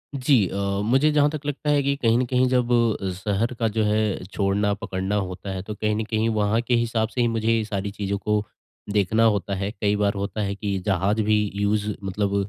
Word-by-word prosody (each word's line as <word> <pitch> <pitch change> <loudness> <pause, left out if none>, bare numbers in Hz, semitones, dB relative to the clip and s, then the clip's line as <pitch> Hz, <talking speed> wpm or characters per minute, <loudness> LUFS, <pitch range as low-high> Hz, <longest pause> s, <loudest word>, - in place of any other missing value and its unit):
जी 135 +1 +3
अ, - - -6 0.3
मुझे 135 +7 +3
जहाँ 150 -1 +4
तक 150 -1 -6
लगता 145 +1 -3
है 145 -1 +3
कि 140 +1 +1
कहीं 115 -1 +3
न 125 - +1
कहीं 125 +1 +2
जब 125 -1 +1 0.4
शहर 105 +6 -1
का 115 - +2
जो 110 0 0
है, 105 -2 0
छोड़ना-पकड़ना 100 0 -1
होता 95 0 -3
है, 95 -1 -4
तो 105 +2 -6
कहीं 105 0 -1
न 110 - -1
कहीं 110 0 +1
वहाँ 105 0 +1
के 120 +1 -1
हिसाब 115 -1 +1
से 125 - -2
ही 120 - +3
मुझे 115 -1 -2
ये 115 -1 +1
सारी 100 -1 -3
चीज़ों 100 0 -3
को 105 +1 0 0.5
देखना 105 +3 +2
होता 100 -3 +1
है। 100 +2 -3
कई 105 -1 +2
बार 100 -1 +1
होता 100 +2 -3
है, 100 -1 -2
कि 100 -1 -2
जहाज़ 100 +2 +1
भी 105 0 +2
यूज़ 105 +1 0
मतलब 100 +1 -1
105 Hz, 215 wpm, -24 LUFS, 100-115 Hz, 0.5 s, जहाँ